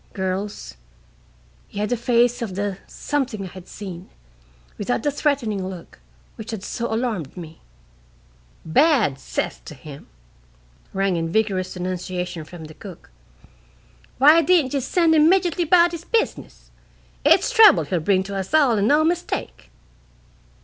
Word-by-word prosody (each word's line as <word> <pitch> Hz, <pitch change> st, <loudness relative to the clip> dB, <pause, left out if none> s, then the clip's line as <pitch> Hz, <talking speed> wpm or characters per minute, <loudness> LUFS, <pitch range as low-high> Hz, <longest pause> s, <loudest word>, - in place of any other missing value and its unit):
Girls, 190 Hz, -, -4 dB, 0.9 s
he -, -, -13 dB
had 210 Hz, 0 st, -1 dB
the 245 Hz, -, +1 dB
face 240 Hz, +1 st, +1 dB
of 210 Hz, -6 st, -4 dB
the 200 Hz, -1 st, -3 dB
Something 265 Hz, -8 st, -3 dB
I 190 Hz, -, -7 dB
had 185 Hz, 0 st, -12 dB
seen, 185 Hz, -3 st, -9 dB, 0.7 s
without 225 Hz, +3 st, -2 dB
the 290 Hz, -, +1 dB
threatening 270 Hz, -9 st, -1 dB
look, 180 Hz, -3 st, -11 dB, 0.4 s
which 220 Hz, -1 st, -9 dB
had 220 Hz, -5 st, -5 dB
so 235 Hz, +2 st, -4 dB
alarmed 220 Hz, -, -3 dB
me." 165 Hz, -2 st, -10 dB, 1.0 s
"Bad 210 Hz, -, +3 dB
'cess -, -, -4 dB
to 150 Hz, -, -9 dB
him!" 145 Hz, +1 st, -12 dB, 0.8 s
rang 195 Hz, -2 st, 0 dB
in 165 Hz, 0 st, -2 dB
vigorous 190 Hz, -2 st, -1 dB
denunciation 180 Hz, -2 st, -4 dB
from 170 Hz, 0 st, -11 dB
the 155 Hz, 0 st, -10 dB
cook. 180 Hz, -, -12 dB, 1.1 s
"Why 300 Hz, +5 st, +7 dB
didn't 315 Hz, -5 st, +2 dB
ye 280 Hz, -, +1 dB
send 325 Hz, +5 st, +2 dB
him 310 Hz, 0 st, +5 dB
'mejitly 355 Hz, -2 st, +2 dB
about 345 Hz, +1 st, +5 dB
his 340 Hz, -1 st, -7 dB
business? 455 Hz, +4 st, -3 dB, 0.5 s
It's -, -, +4 dB
trouble 450 Hz, -4 st, +7 dB
he'll 180 Hz, -, -2 dB
bring 190 Hz, +3 st, +1 dB
to 200 Hz, +1 st, -7 dB
us 195 Hz, +8 st, -2 dB
all 265 Hz, -8 st, +4 dB
and 200 Hz, -, +2 dB
no 300 Hz, +4 st, +4 dB
mistake!" 330 Hz, -, -3 dB
210 Hz, 145 wpm, -22 LUFS, 185-290 Hz, 1.1 s, Why